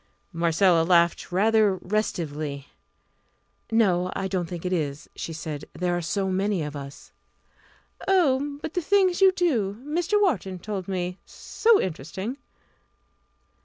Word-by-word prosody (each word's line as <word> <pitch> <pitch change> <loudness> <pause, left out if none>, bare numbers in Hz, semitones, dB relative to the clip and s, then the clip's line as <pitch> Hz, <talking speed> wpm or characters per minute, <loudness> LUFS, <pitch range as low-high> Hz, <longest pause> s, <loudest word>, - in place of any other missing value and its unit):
Marcella 170 +1 +3
laughed 170 +1 +2
rather 210 +1 +3
restively. 155 -8 -3 1.1
"No, 185 -5 +2
I 195 - -2
don't 185 -3 -2
think 175 0 -7
it 180 - 0
is," 150 -4 -2
she - - -5
said; 155 -2 -6
"there 180 -1 0
are 175 - -1
so 190 +4 -1
many 190 -1 0
of 150 0 -6
us." 140 0 -9 1.0
"Oh, 290 -7 +2
but 320 - -4
the 360 - 0
things 375 +1 +2
you 385 -1 +7
do 250 - 0
Mr. 350 +7 +1
Wharton 225 - 0
told 195 0 -5
me 180 -1 -3
so 455 -2 +2
interesting!" 190 - -4
190 Hz, 130 wpm, -25 LUFS, 170-260 Hz, 1.1 s, you